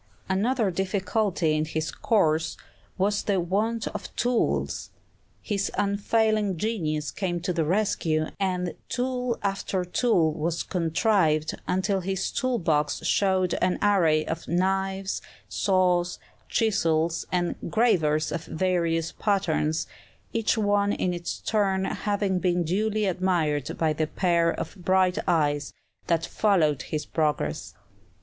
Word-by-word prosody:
Another 210 +2 +1
difficulty 190 -2 0
in 155 - +1
his 155 0 -3
course 160 -7 +1 0.4
was 200 +2 +1
the 200 -2 0
want 210 +6 0
of - - -6
tools; 245 0 0 0.5
his 200 -2 -1
unfailing 205 -1 +1
genius 155 -8 -2
came 175 -3 -2
to 180 +1 -1
the 165 -2 +1
rescue, 165 -4 +1
and 180 -2 -1 0.2
tool 250 -1 -1
after 195 -2 -1
tool 180 -5 +2
was 165 +1 -2
contrived, 165 -2 +1
until 190 +2 +1
his 190 +1 -2
tool 255 -1 0
box 155 -4 0
showed 185 -1 +2
an 180 0 +2
array 165 -7 +3
of 165 0 -4
knives, 190 +2 0 0.3
saws, 180 -2 +1 0.3
chisels, 165 -7 +1
and 175 -1 0 0.2
gravers 160 -9 +2
of 165 +1 -4
various 165 -2 0
patterns, 165 -6 0 0.5
each 225 0 +1
one 205 -1 +2
in 180 - -1
its 175 -1 -4
turn 195 -3 0
having 200 -3 -1
been 175 -1 +1
duly 210 +5 0
admired 165 -5 0
by 160 -2 +1
the 155 0 -1
pair 170 0 +2
of - - -4
bright 185 0 +2
eyes 145 -4 +1 0.4
that 165 -1 +1
followed 160 -10 +2
his 150 +2 -4
progress. 150 - -1
185 Hz, 125 wpm, -26 LUFS, 165-200 Hz, 0.5 s, array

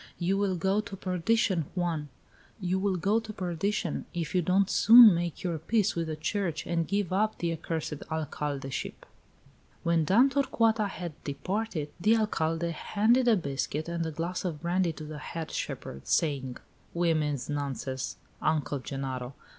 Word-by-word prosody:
You 185 +2 +1
will 195 -2 +1
go 190 +4 +1
to 205 -2 -8
perdition, 185 -1 +1
Juan, 165 -5 -1 0.5
you 185 -1 0
will 195 -1 +1
go 200 +6 +2
to 225 -1 -8
perdition, 180 -2 -2
if 170 -3 -3
you 180 - +3
don't 185 +3 +3
soon 230 0 +9
make 170 -1 -3
your 170 -3 -1
peace 210 +5 +1
with 165 -1 -1
the 155 - -3
church 165 +1 -2
and 165 -1 -1
give 200 -3 -1
up 215 +3 +1
the 170 -1 -1
accursed 160 -2 -4
alcaldeship!" 145 -4 -4 0.8
When 170 -1 +2
Dame 230 - +5
Torcuata 230 -6 +2
had 175 -5 -7
departed, 155 +2 -3
the 215 +6 +4
Alcalde 170 -6 0
handed 225 +9 +2
a 230 - +6
biscuit 150 0 -3
and 170 0 -2
a 160 - -2
glass 165 +4 -3
of 165 -5 -3
brandy 175 0 +1
to 155 - -9
the 150 -1 -7
head 165 +1 -6
shepherd, 65 +1 -5
saying: 135 -6 0 0.4
"Women's 155 -5 +1
nonsense, 135 -8 -3 0.2
Uncle 150 -2 0
Genaro! 130 -1 -5
170 Hz, 155 wpm, -29 LUFS, 155-195 Hz, 0.8 s, soon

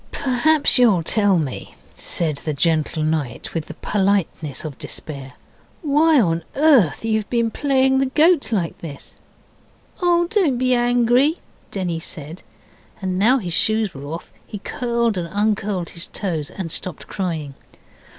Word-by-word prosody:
'Perhaps 280 +2 +3
you'll 210 -9 +4
tell 205 +1 +3
me,' 145 -6 -4 0.2
said 155 -4 -2
the 150 +1 -4
gentle 155 +1 +1
knight, 155 -6 -2
with 165 -2 -3
the - - -9
politeness 190 -8 -1
of 150 -4 -7
despair, 135 -4 -5 0.5
'why 305 +1 +4
on 170 -6 +1
earth 270 - +3
you've 220 -2 -1
played 265 +3 +1
the 270 - +1
goat 320 -3 +4
like 180 -7 -1
this?' 145 -4 -9 0.8
'Oh, 345 -1 +3
don't 345 - +1
be 255 0 +2
angry,' 245 +5 +3 0.3
Denny 180 -4 -3
said; 160 0 -8 0.6
and 185 -2 -2
now 240 +7 +4
his 180 -9 -4
shoes 220 +1 +2
were 135 +1 -9
off, 165 - -7 0.2
he 210 - -6
curled 235 -1 -1
and 170 -1 -5
uncurled 205 -3 -1
his 170 - -6
toes 165 -6 -3
and 180 -4 -6
stopped 180 -1 -2
crying. 160 -7 -4
200 Hz, 140 wpm, -21 LUFS, 165-250 Hz, 0.8 s, you'll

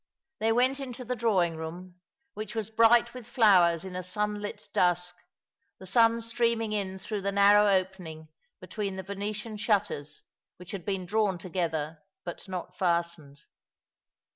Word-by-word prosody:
They 225 +1 +2
went 255 +4 +2
into 255 -2 -6
the 250 +2 -2
drawing 190 -8 +1
room, 175 +3 -8 0.3
which 215 +2 -6
was 220 -1 -3
bright 230 +1 +5
with 250 -3 -9
flowers 190 -8 +4
in 185 -1 -7
a 185 - -2
sunlit 210 +2 -4
dusk, 180 0 +1 0.6
the 190 - -12
sun 230 +3 +3
streaming 230 -1 0
in 190 -2 -2
through 205 +2 -4
the 200 +1 -1
narrow 205 +1 +6
opening 185 -5 -1 0.3
between 200 -3 -4
the 190 - -5
Venetian 210 +3 -5
shutters, 205 -9 -1 0.3
which 180 0 -10
had 195 -4 -6
been 195 -3 -2
drawn 205 -1 +1
together, 165 -3 -3 0.2
but 175 +3 -7
not 185 -2 -6
fastened. 170 -5 -1
200 Hz, 145 wpm, -28 LUFS, 175-220 Hz, 0.6 s, narrow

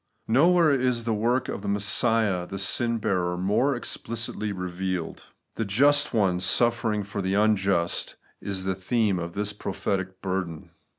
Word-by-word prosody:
Nowhere 165 +6 +4
is 125 -3 0
the 115 -1 -1
work 120 +4 0
of 100 - -5
Messiah 100 -1 +1
the 95 - -6
sin 115 +4 +2
bearer 90 -4 -1
more 105 +10 +1
explicitly 115 -3 -3
revealed. 90 -1 -4 0.3
The 115 - -2
just 140 +8 +3
One 95 -6 +1
suffering 115 +2 +1
for 100 0 -5
the 95 0 -1
imjust 100 -4 +1 0.3
is 95 -2 -3
the 95 0 -1
theme 95 +1 0
of 85 0 -5
this 105 +2 -2
prophetic 95 -2 -3
burden. 95 -4 -4
100 Hz, 140 wpm, -25 LUFS, 95-115 Hz, 0.3 s, Nowhere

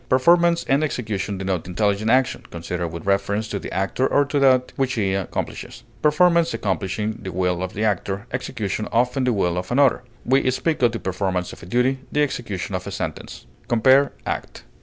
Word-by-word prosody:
Performance 170 +6 +4
and 140 +3 +3
execution 105 -8 -2
denote 95 -3 -2
intelligent 100 +3 0
action, 130 +2 +2
considered 85 +1 -4
with 85 +1 -8
reference 100 +2 0
to 100 - -3
the - - -7
actor 100 +8 0
or 145 - +3
to 145 +1 -1
that 130 -2 +3
which 130 -2 0
he 100 -5 0
accomplishes; 95 -2 -4 0.2
performance 170 -1 +3
accomplishing 105 0 -2
the 95 -2 -5
will 90 0 0
of 95 0 -4
the 105 - -2
actor, 100 -1 -1
execution 110 -5 -3
often 125 +3 +1
the 125 - +2
will 90 -5 0
of 90 - -7
another; 135 +1 +4 0.2
we 130 +1 +3
speak 155 +4 -1
of 120 -2 +4
the 115 - -3
performance 95 -1 -2
of - - -13
a 85 - -11
duty, 125 +5 +1
the 150 - +2
execution 115 - -3
of - - -3
a - - -4
sentence. - - -6 0.2
Compare 130 +4 +4
ACT. - - -5
110 Hz, 185 wpm, -22 LUFS, 95-130 Hz, 0.2 s, Performance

